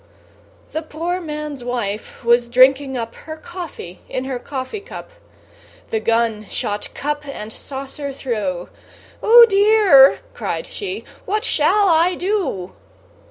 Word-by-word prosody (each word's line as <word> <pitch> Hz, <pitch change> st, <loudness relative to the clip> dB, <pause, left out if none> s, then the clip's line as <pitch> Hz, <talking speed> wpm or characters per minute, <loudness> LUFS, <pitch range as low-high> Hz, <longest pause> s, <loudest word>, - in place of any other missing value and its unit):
The 315 Hz, -, -2 dB
poor 335 Hz, +3 st, -3 dB
man's 300 Hz, -4 st, -6 dB
wife 235 Hz, -1 st, -4 dB
was 240 Hz, 0 st, +3 dB
drinking 265 Hz, +2 st, +4 dB
up 230 Hz, -1 st, -4 dB
Her 315 Hz, 0 st, -9 dB
coffee 320 Hz, -, -9 dB
in 255 Hz, -, -3 dB
her 260 Hz, -2 st, -3 dB
coffee 265 Hz, -, -5 dB
cup; 410 Hz, -, -10 dB, 0.8 s
The 220 Hz, -, +1 dB
gun 225 Hz, -1 st, 0 dB
shot 205 Hz, 0 st, -4 dB
cup 295 Hz, +1 st, -3 dB
and 220 Hz, -5 st, -7 dB
saucer 275 Hz, +1 st, -6 dB
through; 210 Hz, -10 st, -3 dB, 0.5 s
"Oh 470 Hz, +1 st, +9 dB
dear!" 400 Hz, -9 st, +6 dB
cried -, -, -4 dB
she; 405 Hz, -1 st, -6 dB, 0.2 s
"what 425 Hz, +2 st, 0 dB
shall 400 Hz, +1 st, +2 dB
I 340 Hz, +1 st, +3 dB
do?" 355 Hz, -, -2 dB
275 Hz, 125 wpm, -20 LUFS, 235-355 Hz, 0.8 s, Oh